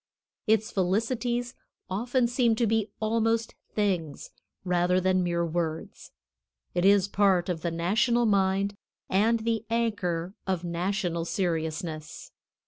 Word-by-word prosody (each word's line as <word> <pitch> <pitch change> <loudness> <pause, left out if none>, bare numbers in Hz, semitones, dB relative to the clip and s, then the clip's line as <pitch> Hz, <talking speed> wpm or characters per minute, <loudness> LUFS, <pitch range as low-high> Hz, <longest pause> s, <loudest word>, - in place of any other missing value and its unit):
Its 220 +1 +2
felicities 235 +5 0 0.3
often 240 +6 0
seem 235 -1 +2
to 235 - +1
be 220 -1 +1
almost 225 +1 0 0.2
things 185 -8 -1 0.3
rather 180 0 +2
than 185 0 +2
mere 170 -1 0
words. 165 -1 -4 0.6
It 175 +1 +1
is 200 -1 +5
part 195 -3 +2
of 170 -3 -2
the 170 - -1
national 220 +9 +2
mind, 195 -1 +2 0.4
and 220 +4 +3
the 225 -1 -1
anchor 195 -7 -1
of 185 -2 -1
national 175 0 -1
seriousness. 160 -3 -3
195 Hz, 120 wpm, -27 LUFS, 175-225 Hz, 0.6 s, is